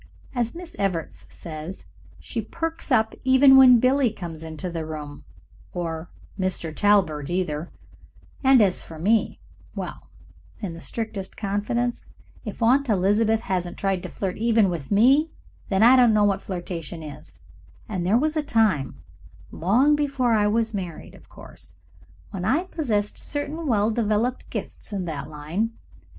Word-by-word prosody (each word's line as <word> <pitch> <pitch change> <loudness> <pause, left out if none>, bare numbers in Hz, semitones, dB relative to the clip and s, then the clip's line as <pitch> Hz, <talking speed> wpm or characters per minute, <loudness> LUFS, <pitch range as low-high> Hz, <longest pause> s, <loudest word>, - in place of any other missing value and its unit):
As 240 -3 -1
Mrs. 345 0 -10
Evarts 185 -5 -2
says, 160 +3 -8 0.3
she 230 - -4
perks 330 +6 -5
up 220 -3 +3
even 265 +1 +7
when 255 -2 +8
Billie 255 +1 +3
comes 170 -7 -8
into 160 +3 -6
the 170 -2 -4
room 150 -2 -7 0.5
or 165 -2 -4 0.3
Mr. 180 -4 -2
Talbert, 185 -9 +2
either; 175 -3 -2 0.7
and 265 -4 +6
as 190 -3 +1
for 165 - -11
me 210 +7 +1 0.4
well, - - -7 0.5
in 195 -6 -5
the 165 - -10
strictest 215 -3 -4
confidence, 220 +4 -2 0.4
if - - -5
Aunt 260 +3 +3
Elizabeth 215 +3 +2
hasn't 180 -5 -3
tried 195 -2 0
to - - -7
flirt 190 -2 -4
even 225 -3 +3
with 160 -6 -5
me, 265 +10 +4 0.4
then 195 +1 +3
I 245 +3 +8
don't 245 -4 +5
know 210 - +4
what 200 -1 +2
flirtation 175 -3 -6
is, 150 -2 -11 0.5
and 190 -6 -3
there 195 +6 +3
was 305 +4 0
a 310 - +2
time 220 - +1 0.5
long 245 - +3
before 275 -5 +1
I 210 -1 +3
was 225 +1 0
married, 180 -5 -6
of - - -17
course - - -11 0.6
when 190 -3 -5
I 290 - +2
possessed 230 - -2
certain 295 +2 -4
well 215 -3 +2
developed 225 +2 -1
gifts - - -6
in 195 -3 -3
that 150 -3 -5
line. 160 +10 -3
205 Hz, 150 wpm, -24 LUFS, 175-245 Hz, 0.7 s, when